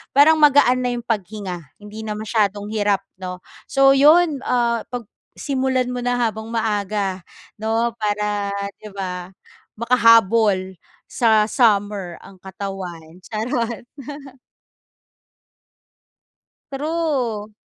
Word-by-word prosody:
parang 310 +3 +7
magaan 285 -4 +5
na 245 - 0
yung 240 - -4
paghinga, 200 -4 -3 0.2
hindi 210 +1 -9
na 210 - -2
masyadong 210 -1 -1
hirap 205 -2 +1 0.2
'no? 180 -1 -6 0.3
So, 270 0 +4
'yon, 300 +2 +5
ah, 235 -2 +1
'pag 245 -2 -6 0.3
simulan 260 -2 -1
mo 250 - -3
na 245 0 +1
habang 220 -1 -1
maaga 205 -3 -1 0.4
'no. 225 +2 0
Para, 210 -1 -1 0.3
'di 210 -2 -11
ba, 180 -1 -5 0.4
makahabol 225 -5 +3 0.3
sa 220 -2 +3
summer 205 -6 +1
ang 195 - -14
katawan. 185 -4 -7
Charot. 230 +1 -2 2.9
True. 270 -8 -2
220 Hz, 100 wpm, -21 LUFS, 200-245 Hz, 2.9 s, parang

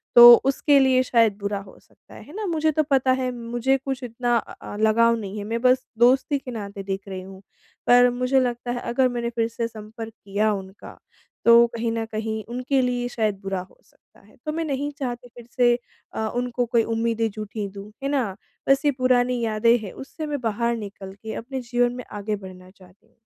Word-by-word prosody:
तो 240 0 +12
उसके 275 +1 +3
लिए 260 -1 +4
शायद 230 -5 +3
बुरा 200 0 -2
हो 195 -1 -13
सकता - - -22
है, - - -11
है 295 - -14
ना? 425 0 -3
मुझे 315 -3 +1
तो 310 +1 +1
पता 265 -1 +3
है 255 0 -1
मुझे 240 +3 0
कुछ 270 -1 -5
इतना 240 0 -1
अ - - -5 0.2
अ, - - -6
लगाव 230 +2 +4
नहीं 205 -1 -6
है 205 - -4
मैं 230 +2 -3
बस 255 0 +3
दोस्ती 265 +4 +4
के 255 - -8
नाते 200 -3 -6
देख 195 +1 -5
रही 190 -1 -5
हूँ। 190 0 -12 0.5
पर 245 0 +7
मुझे 250 +2 +1
लगता 245 -1 -2
है 245 - -2
अगर 255 +2 +3
मैंने 235 -1 -2
फिर 230 -1 +1
से 230 0 -3
संपर्क 220 0 -9
किया 205 +2 +1
उनका 190 0 -9 0.5
तो 235 0 +8
कहीं 230 0 -1
न 225 0 -2
कहीं 220 0 -3
उनके 255 +2 0
लिए 245 -1 -1
शायद 215 -4 0
बुरा 195 -1 -2
हो - - -24
सकता - - -28
है - - -21
तो 305 - -1
मैं 330 +1 -2
नहीं 285 0 -2
चाहती 245 -2 -4
फिर 240 -1 -12
से 240 -1 +4 0.4
अ, 220 - -2
उनको 245 0 -1
कोई 230 -1 +2
उम्मीदें 225 0 0
झूठी 210 0 -5
दूँ। 200 +1 -10
है 275 - 0
ना? 245 -9 -1 0.3
बस 275 +2 +4
ये 290 - +5
पुरानी 250 -1 +2
यादें 230 +1 +3
हैं 205 -4 -7
उससे 310 +4 -7
मैं 290 -3 -3
बाहर 235 +1 0
निकल 200 -2 -8
के 220 - -5
अपने 260 +3 -5
जीवन 245 0 +1
में 250 - -6
आगे 210 0 -3
बढ़ना 185 -2 -11
चाहती 185 0 -21
हूँ। - - -35
235 Hz, 215 wpm, -24 LUFS, 215-255 Hz, 0.5 s, तो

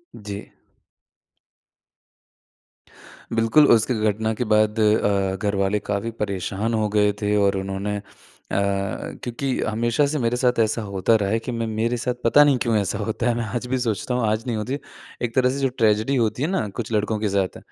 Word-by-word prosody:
जी। 100 -1 -6 2.9
बिल्कुल 115 +6 +4
उस 115 -2 +4
घ - - +3 0.2
घटना 110 +2 -1
के 125 - -2
बाद 110 +1 +2
अ, 100 -3 +2
घर 105 -1 -1
वाले 100 +2 +1
काफ़ी 100 +3 -3
परेशान 100 +2 -2
हो 110 -1 +1
गए 105 -1 +3
थे 105 0 +1
और 100 -1 +2
उन्होंने 95 +2 -3
अ, - - -6 0.5
क्योंकि 100 +6 -2
हमेशा 120 +5 +1
से 150 0 -1
मेरे 120 0 0
साथ 125 -2 +1
ऐसा 110 +1 +1
होता 100 +2 +1
रहा 100 -2 +1
है 115 - +1
कि 125 +2 -5
मैं 115 -1 -2
मेरे 115 +2 -1
साथ 125 +1 -1
पता 145 +5 +6
नहीं 140 -3 +3
क्यों 115 -2 +1
ऐसा 100 0 -1
होता 110 +3 -2
है, 115 - +1
मैं 115 -1 -2
आज 120 +2 -4
भी 130 - 0
सोचता 120 +1 -2
हूँ 120 -3 +1
आज 110 +2 0
नहीं 115 -3 -1
होती, 130 +7 -3 0.4
एक 120 -1 -3
तरह 125 -1 +4
से 135 +2 -2
जो 135 -1 +1
ट्रेजेडी 110 +4 +2
होती 115 0 0
है - - +1
ना, 190 - -1
कुछ 115 +2 -6
लड़कों 105 0 0
के 105 -2 0
साथ 95 -1 -1
110 Hz, 195 wpm, -23 LUFS, 105-120 Hz, 2.9 s, पता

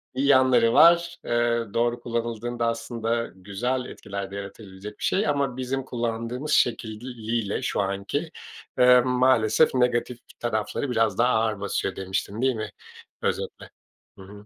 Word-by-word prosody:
Bir 130 - 0
yanları 130 -4 +5
var. 170 +2 +5
Eee, 120 0 +1
doğru 120 +1 +1
kullanıldığında 120 0 -3
aslında 115 0 -2
güzel 105 +7 -2
bir - - -9
etkiler 100 -1 -6
de - - -7
yaratabilecek 100 0 -9
bir - - -8
şey 195 0 +1
ama 140 -4 0
bizim 130 +1 -2
kullandığımız 120 +3 -3
şekliyle, 115 -3 -1
şu - - -1
anki, 100 - -3 0.5
eee, 125 0 +7
maalesef, 125 +1 +3
negatif 125 -1 +1 0.2
tarafları 120 +3 -2
biraz 110 -4 +1
daha 120 +2 +3
ağır 110 -2 +1
basıyor, 95 -1 -2
demiştin, 95 +3 -3
değil 130 -1 +2
mi, 110 -1 -4 0.5
özetle? - - -3 0.5
Hı - - -12
hı. 100 +2 -13
120 Hz, 140 wpm, -25 LUFS, 105-125 Hz, 0.5 s, eee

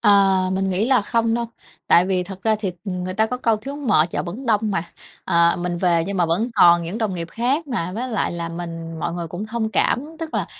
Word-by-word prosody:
À, 195 -3 +4
mình 190 0 0
nghĩ 190 +5 +1
là 255 -4 +3
không 230 +1 +1
đâu, 235 0 -1 0.4
tại 175 +2 +5
vì 185 -1 +1
thật 190 0 -9
ra 220 -1 +2
thì 190 -4 -2
ng 180 -2 -3
người 185 0 -4
ta 220 +2 +2
có 250 +3 -3
câu 230 -3 +1
thiếu 275 +7 -7
mợ 230 - +3
chợ - - -2
vẫn 210 +10 -7
đông 215 -2 +3
mà. 170 -3 -3 0.3
Ờ, 170 0 +3
mình 175 0 -2
về 170 -2 +2
nhưng 200 0 -3
mà 175 -2 +2
vẫn 180 +9 +1
còn 175 -4 +6
những 175 +7 -5
đồng 215 -4 -1
nghiệp 170 -1 -4
khác 265 +7 0
mà, 180 -10 -3
với 240 +6 -3
lại 220 -6 -1
là 170 -1 -4
mình 165 -1 -6
mọi 165 - -2
người 170 -1 -4
cũng 180 +6 -5
thông 220 0 -2
cảm, 245 +5 +1
tức 325 -1 -6
là - - 0
195 Hz, 255 wpm, -21 LUFS, 175-225 Hz, 0.4 s, còn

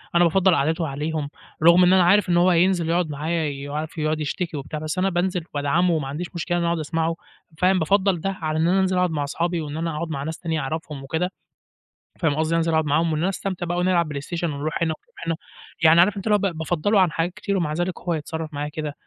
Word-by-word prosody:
أنا 175 - +6
بافضّل 185 +1 +4
قعدته 160 +3 0
عليهم، 150 +1 -3 0.3
رغم 170 +2 +7
إن 180 +1 +5
أنا 185 -1 +5
عارف 190 +2 +4
إن 175 - +3
هو 175 +1 +5
هينزل 175 -1 +2
يقعد 170 -1 +1
معايا 155 +3 -1
ي 140 0 -6
عارف 155 +3 -5
يقعد 155 0 0
يشتكي 160 +2 -3
وبتاع. 145 +2 -5
بس 155 +2 -4
أنا 190 +1 +2
بانزل 180 -1 -1
وادعمه 155 +5 +2
وما 155 -4 -1
عنديش 155 +6 -4
مشكلة 175 +1 -1
أنا 170 - 0
أقعد 170 -1 0
أسمعه 165 +1 -1 0.4
فاهم؟ 185 +2 +3
بافضّل 190 +1 +2
ده 195 - -1
على 155 -1 -1
إن 165 - +3
أنا 190 +2 +3
أنزل 190 -1 +1
أقعد 180 -1 +2
مع 150 -2 -1
اصحابي 170 +4 -1
وإن 150 0 -5
أنا 165 -1 -2
أقعد 165 +2 -3
مع 140 -3 -3
ناس 160 +2 -4
تانية 160 -2 -2
أعرفهم 150 0 -5
وكده، 160 +6 -2 0.9
فاهم 155 -5 +1
قصدي؟ 160 +1 0
أنزل 165 0 +1
أقعد 160 -1 +2
معاهم 160 +3 +2
وإن 155 - -1
أنا 180 - +2
أستمتع 190 -2 -3
بقى 175 +1 -2
ونلعب 180 -2 +2
بلايستيشن 155 +3 -3
ونروح 150 +3 -2
هنا 160 -1 +1
ونرُوح 155 - -19
هنا. 165 - +1 0.5
يعني 160 +1 +7
عارف 195 +4 +4
أنت 195 +2 -5
اللي 210 - +4
هو - - +2
ب - - -11
بافضّله 175 +6 +1
عن 180 -3 +3
حاجات 165 +3 -1
كتير 200 +1 -2
ومع 160 -4 -1
ذلك 175 +2 -2
هو 175 -1 -2
يتصرّف 160 0 -5
معايا 145 +1 -3
كده! 150 -1 -5
165 Hz, 240 wpm, -23 LUFS, 155-180 Hz, 0.9 s, رغم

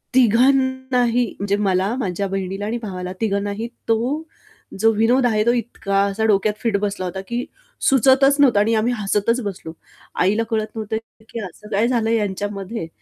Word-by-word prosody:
तिघांनाही 255 0 +3
म्हणजे 200 0 0
मला, 195 +2 +1
माझ्या 200 -3 -2
बहिणीला 195 +1 -3
आणि 225 +3 -2
भावाला 185 -4 -5
तिघांनाही 205 +1 -1 0.2
तो 250 +8 0 0.6
जो 225 +2 +5
विनोद 235 +4 +3
आहे, 215 -3 +2
तो 235 - +4
इतका 200 -4 -1
असा 200 +2 -1
डोक्यात 210 0 +2
फिट 225 -4 +1
बसला 200 -2 -2
होता 190 +1 -4
की 240 +1 -2 0.4
सुचतच 270 +1 +5
नव्हता 250 -7 +5
आणि 215 +2 +2
आम्ही 225 +3 +1
हसतच 210 +4 0
बसलो. 190 -5 -6 0.5
आईला 210 +5 +2
कळत 215 -1 0
नव्हतं 220 0 -3 0.3
की 230 - -6
"असं 190 +4 -12
काय 210 +3 +2
झालं 235 -3 +1
ह्यांच्यामध्ये?" 205 -2 -2
215 Hz, 155 wpm, -21 LUFS, 200-240 Hz, 0.6 s, जो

